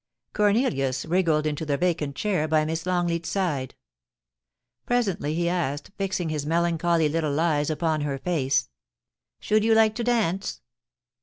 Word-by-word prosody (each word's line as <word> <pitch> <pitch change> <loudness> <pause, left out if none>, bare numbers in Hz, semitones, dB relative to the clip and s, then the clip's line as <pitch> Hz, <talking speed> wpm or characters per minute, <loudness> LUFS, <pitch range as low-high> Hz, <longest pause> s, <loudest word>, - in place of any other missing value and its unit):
Cornelius 200 - +1
wriggled 165 -3 +1
into 150 0 -2
the 145 -2 -1
vacant 160 -5 -1
chair 185 -7 0
by 155 0 +2
Miss 160 +2 -3
Long 180 -1 +1
leat's 170 -1 -2
side. 150 -10 -2 1.1
Presently 195 -11 0
he 170 +1 0
asked, 155 -4 -2
fixing 190 -4 -2
his 150 -2 -2
melancholy 170 0 +1
little 155 -1 -1
eyes 155 -3 +1
upon 155 -1 0
her 140 -2 -2
face: 140 -4 0 0.3
' - - -66 0.3
Should 215 0 +1
you 225 0 +4
like 220 -1 +4
to 235 +2 -3
dance 215 -6 0
165 Hz, 150 wpm, -25 LUFS, 150-185 Hz, 1.1 s, you